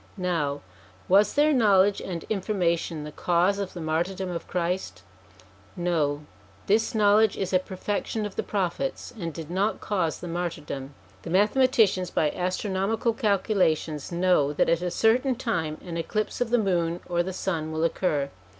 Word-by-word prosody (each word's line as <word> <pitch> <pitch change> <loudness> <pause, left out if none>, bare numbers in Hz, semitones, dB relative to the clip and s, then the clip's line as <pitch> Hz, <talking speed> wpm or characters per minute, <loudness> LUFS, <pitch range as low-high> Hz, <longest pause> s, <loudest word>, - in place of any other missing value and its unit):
Now, 160 -6 -1 0.5
was 200 +3 +4
their 300 +1 +4
knowledge 205 -5 +4
and 170 -3 -5
information 180 -6 -1
the 150 - -7
cause 180 +5 +1
of 195 -2 -4
the 175 - -7
martyrdom 175 +4 -1
of 170 - -5
Christ? 175 - -2 0.7
No; 155 -4 0 0.4
this 220 +3 +2
knowledge 210 0 +4
is 190 -1 -3
a 185 - +5
perfec 190 +2 -4
tion 220 -2 -2
of 205 - -6
the - - 0
Prophets, 200 +7 -2
and 170 -3 -3
did 160 +1 -8
not 200 +4 0
cause 180 -6 -1
the 175 - -7
martyrdom. 150 -5 -4 0.3
The - - -8
mathematicians 210 -1 +3
by 150 -3 +1
astronomical 195 +5 -1
calculations 190 - 0
know 170 -5 +2
that - - +2
at 170 0 +2
a 180 - -1
certain 245 +7 +2
time 165 -11 -2
an 170 -2 -5
eclipse 215 +8 -2
of 245 - +1
the 245 - +3
moon 175 -5 0
or 175 -1 +1
the 185 +2 -3
sun 165 -4 -3
will 160 +1 -1
occur. 150 -5 0
180 Hz, 160 wpm, -26 LUFS, 165-205 Hz, 0.7 s, a